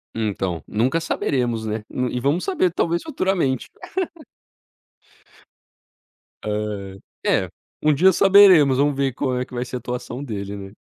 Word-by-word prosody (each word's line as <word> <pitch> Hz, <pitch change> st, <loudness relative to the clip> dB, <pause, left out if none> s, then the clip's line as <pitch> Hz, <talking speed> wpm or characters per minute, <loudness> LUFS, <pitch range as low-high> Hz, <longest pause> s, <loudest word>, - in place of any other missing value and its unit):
Então, 95 Hz, -6 st, -2 dB
nunca 130 Hz, +10 st, 0 dB
saberemos, 120 Hz, -8 st, -1 dB
né. 110 Hz, 0 st, -3 dB, 0.3 s
E 125 Hz, -, -2 dB
vamos 140 Hz, +7 st, 0 dB
saber 315 Hz, -, +1 dB
talvez, 170 Hz, 0 st, 0 dB
futuramente. 185 Hz, -, -1 dB, 2.8 s
Ah. 105 Hz, -2 st, -4 dB, 0.3 s
É, -, -, +2 dB, 0.3 s
um 150 Hz, 0 st, +4 dB
dia 185 Hz, +7 st, +5 dB
saberemos. 185 Hz, -8 st, +6 dB
Vamos 145 Hz, 0 st, +2 dB
ver 135 Hz, -2 st, 0 dB
como 130 Hz, -1 st, -1 dB
é 125 Hz, -, -2 dB
que -, -, -18 dB
vai 120 Hz, 0 st, -2 dB
ser 125 Hz, 0 st, -5 dB
a -, -, -6 dB
atuação 125 Hz, +2 st, -5 dB
dele, 100 Hz, -5 st, -5 dB
né. 95 Hz, 0 st, -9 dB
130 Hz, 140 wpm, -22 LUFS, 110-160 Hz, 2.8 s, saberemos